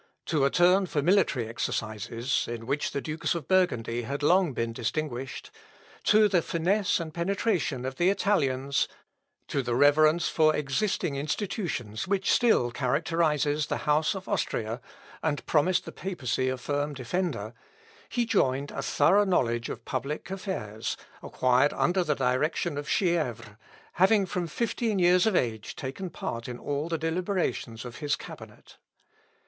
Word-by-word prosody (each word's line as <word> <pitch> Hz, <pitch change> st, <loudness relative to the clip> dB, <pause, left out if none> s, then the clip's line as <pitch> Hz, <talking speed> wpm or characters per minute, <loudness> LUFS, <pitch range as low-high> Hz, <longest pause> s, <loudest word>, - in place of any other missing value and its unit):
To 150 Hz, -5 st, +2 dB
a -, -, +4 dB
turn 180 Hz, +4 st, +4 dB
for 145 Hz, -4 st, -1 dB
military 170 Hz, -, +2 dB
exercises 115 Hz, +2 st, -2 dB
(in 115 Hz, -1 st, -5 dB
which 140 Hz, +4 st, -1 dB
the 140 Hz, -, -3 dB
dukes 160 Hz, +3 st, -2 dB
of 165 Hz, -5 st, -5 dB
Burgundy 120 Hz, -11 st, +1 dB
had 140 Hz, +5 st, -4 dB
long 180 Hz, +1 st, +4 dB
been 115 Hz, -2 st, -2 dB
distinguished) 125 Hz, +2 st, -4 dB, 0.5 s
to 215 Hz, 0 st, +6 dB
the 185 Hz, -4 st, +2 dB
finesse 185 Hz, +6 st, +1 dB
and 160 Hz, -2 st, -5 dB
penetration 170 Hz, -, -1 dB
of 130 Hz, 0 st, -4 dB
the 175 Hz, +2 st, +3 dB
Italians 140 Hz, -9 st, +1 dB, 0.6 s
to 140 Hz, -, 0 dB
the 120 Hz, -2 st, -2 dB
reverence 155 Hz, +5 st, +4 dB
for 155 Hz, -1 st, +3 dB
existing 150 Hz, +1 st, -1 dB
institutions 150 Hz, -, -3 dB
which 195 Hz, 0 st, +1 dB
still 220 Hz, -, +3 dB
characterises 150 Hz, +2 st, +1 dB
the -, -, -3 dB
house 150 Hz, +4 st, +2 dB
of 190 Hz, 0 st, -7 dB
Austria, 115 Hz, +2 st, -2 dB, 0.4 s
and 150 Hz, -2 st, -1 dB
promised 170 Hz, +4 st, +2 dB
the -, -, -7 dB
papacy 130 Hz, -9 st, -2 dB
a 130 Hz, -, -2 dB
firm 145 Hz, +3 st, -2 dB
defender, 130 Hz, -, -3 dB, 0.6 s
he 240 Hz, -1 st, 0 dB
joined 140 Hz, -, +1 dB
a -, -, -4 dB
thorough 205 Hz, +2 st, +4 dB
knowledge 120 Hz, -, +1 dB
of 115 Hz, -, -7 dB
public 140 Hz, +7 st, -4 dB
affairs, 185 Hz, -, -4 dB, 0.2 s
acquired 130 Hz, +3 st, +2 dB
under 180 Hz, +1 st, +1 dB
the 150 Hz, -3 st, 0 dB
direction 135 Hz, +5 st, 0 dB
of 145 Hz, +1 st, -5 dB
Chièvres, 155 Hz, -, 0 dB, 0.4 s
having 195 Hz, +2 st, +4 dB
from 180 Hz, -1 st, -3 dB
fifteen 225 Hz, +3 st, -1 dB
years 180 Hz, +1 st, +4 dB
of 215 Hz, -, +2 dB
age 110 Hz, -7 st, -1 dB
taken 140 Hz, +8 st, -5 dB
part 115 Hz, -7 st, -5 dB
in 125 Hz, -1 st, -5 dB
all 145 Hz, +5 st, -3 dB
the 165 Hz, -, 0 dB
deliberations 165 Hz, -, -2 dB
of 120 Hz, -, -8 dB
his 145 Hz, -1 st, 0 dB
cabinet. -, -, -12 dB
150 Hz, 150 wpm, -28 LUFS, 125-180 Hz, 0.6 s, to